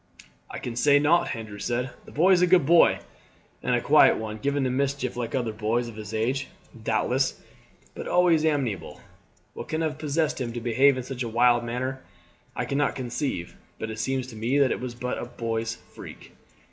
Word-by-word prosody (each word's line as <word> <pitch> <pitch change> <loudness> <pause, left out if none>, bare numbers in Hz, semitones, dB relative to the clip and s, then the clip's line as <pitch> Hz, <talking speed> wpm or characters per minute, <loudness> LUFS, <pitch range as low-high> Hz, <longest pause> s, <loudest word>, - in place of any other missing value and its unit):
"I - - -6
can 120 - -5
say 145 +4 +5
nought," 155 +4 +2
Andrew 110 -3 -8
said. 125 +3 -2
"The - - -13
boy 175 +6 +3
is 180 -2 +5
a 180 - +5
good 175 -4 +5
boy 170 +3 +5 0.6
and - - +1
a - - 0
quiet - - +5
one; 110 -1 -5
given 140 +4 0
to 130 - 0
mischief 135 -1 -1
like 120 0 -3
other 120 -4 -1
boys 110 +3 -1
of 115 - -9
his 105 -1 -8
age, 125 +5 -1 0.4
doubtless, 130 +4 0 0.5
but - - -7
always 175 -3 +3
amenable. 135 - -1 0.5
What - - -7
can 160 +1 -2
have 155 -2 -2
possessed 155 -1 -1
him 120 -2 -3
to 120 - -4
behave 130 +4 +3
in 130 - -3
such 130 0 -6
a 120 - -2
wild 120 +1 +3
manner 130 +3 -3 0.5
I - - -2
cannot 140 +1 0
conceive, 120 - -3 0.2
but 110 - -5
it 110 - -7
seems 130 +2 -1
to 115 - -10
me 115 +6 0
that 140 -3 +4
it - - -1
was 125 -1 -6
but 125 +1 -3
a - - -4
boy's 115 -1 -3
freak." - - -13
125 Hz, 200 wpm, -26 LUFS, 115-140 Hz, 0.6 s, say